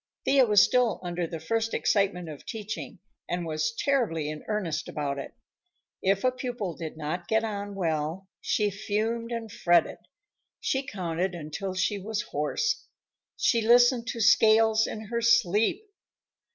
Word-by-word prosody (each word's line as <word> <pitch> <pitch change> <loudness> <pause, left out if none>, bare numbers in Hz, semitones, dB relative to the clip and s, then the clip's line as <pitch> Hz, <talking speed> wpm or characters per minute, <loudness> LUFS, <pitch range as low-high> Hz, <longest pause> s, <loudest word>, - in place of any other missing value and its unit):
Thea 270 -3 +5
was 210 -2 +6
still 245 -5 +2
under 175 -1 -2
the 165 -1 -6
first 225 +7 -1
excitement 195 -4 +1
of 150 -3 -9
teaching, 215 -1 -6 0.3
and 175 0 -2
was 155 -1 -1
terribly 165 - 0
in 155 - -8
earnest 170 -7 -2
about 140 -2 -3
it. 140 - -8 0.7
If 195 +1 +1
a 255 - +4
pupil 245 - -4
did 160 -2 -7
not 160 +3 -4
get 220 +2 +2
on 205 -2 -4
well, 165 +1 -2
she 210 -1 +1
fumed 220 +4 -2
and 230 -2 -4
fretted. 175 -3 +2 0.6
She 270 +1 -1
counted 180 - -2
until 170 +4 -5
she 200 +2 0
was 210 +2 -3
hoarse. 450 - -2 0.5
She 230 -3 +2
listened 240 +1 +5
to 230 - -3
scales 220 0 +5
in 215 - -5
her 235 +2 -3
sleep. 235 - +3
205 Hz, 150 wpm, -27 LUFS, 170-230 Hz, 0.7 s, was